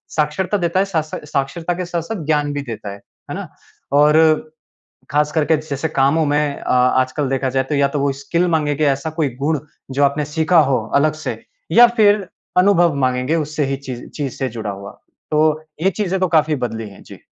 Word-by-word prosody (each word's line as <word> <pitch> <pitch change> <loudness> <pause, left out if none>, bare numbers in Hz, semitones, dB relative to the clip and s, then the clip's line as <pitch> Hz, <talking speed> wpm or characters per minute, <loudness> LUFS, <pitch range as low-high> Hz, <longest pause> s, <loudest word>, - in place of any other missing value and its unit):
साक्षरता 155 +7 0
देता 175 0 0
है, 195 - +3
साथ 170 -6 -1
सा 155 - -7
साक्षरता 150 +5 -2
के 180 +1 -4
साथ-साथ 170 +1 -4
ज्ञान 150 -1 +1
भी 145 - -2
देता 115 -6 -7
है। - - -10 0.3
है - - -3
ना? - - -6 0.4
और 150 +2 +5 0.9
खास 150 0 +1
करके 160 0 +2
जैसे 155 0 -4
कामों 145 +2 +2
में 145 +1 +2 0.2
अ, - - -10
आजकल 130 +2 +2
देखा 135 0 0
जाए 130 +1 0
तो 150 - +1
या 140 0 +3
तो 140 +1 -2
वो 140 0 +1
स्किल 170 +5 +1
माँगेंगे 150 -2 +1
ऐसा 140 +3 0
कोई 150 - +2
गुण 150 +1 0 0.3
जो 140 +2 +2
आपने 140 +1 +1
सीखा 160 +2 +3
हो 130 - +3 0.2
अलग 150 +2 +3
से, - - -3 0.3
या 240 +1 +9
फिर 205 -3 +4 0.3
अनुभव 180 -4 +4
माँगेंगे 125 +5 0
उससे 155 -1 -1
ही 135 0 -1
चीज़ 130 -3 -8
चीज़ 140 -3 -2
से 135 - -1
जुड़ा 110 -2 -5
हुआ। 100 0 -8 0.4
तो 150 0 +3 0.4
ये 190 - +4
चीज़ें 190 -1 -2
तो 185 - +2
काफ़ी 155 -2 +3
बदली 110 -1 -6
हैं। 100 - -15
जी। - - -13
150 Hz, 200 wpm, -19 LUFS, 135-165 Hz, 0.9 s, या